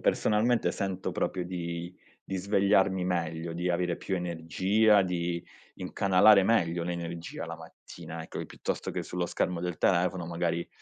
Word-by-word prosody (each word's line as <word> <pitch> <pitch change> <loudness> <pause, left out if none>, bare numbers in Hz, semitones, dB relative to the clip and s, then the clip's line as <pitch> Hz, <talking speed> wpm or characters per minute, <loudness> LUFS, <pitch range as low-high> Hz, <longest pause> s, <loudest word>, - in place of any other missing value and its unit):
personalmente 115 +3 +2
sento 95 -2 -3
proprio 90 - -1
di 85 0 -5 0.3
di 95 - -3
svegliarmi 95 -1 +2
meglio, 85 -2 -2
di 90 +2 -1
avere 90 0 0
più 95 - -3
energia, 95 +5 +2
di 85 -1 -2 0.3
incanalare 100 +1 +5
meglio 90 -5 +2
l'energia 85 -1 -5
la - - -5
mattina, 80 +1 -10
ecco, 80 - -6
piuttosto - - -4
che - - -4
sullo 90 0 -2
schermo 90 -1 -1
del 90 -1 -3
telefono, 90 -1 +1
magari, 85 0 -2
90 Hz, 140 wpm, -29 LUFS, 85-95 Hz, 0.3 s, incanalare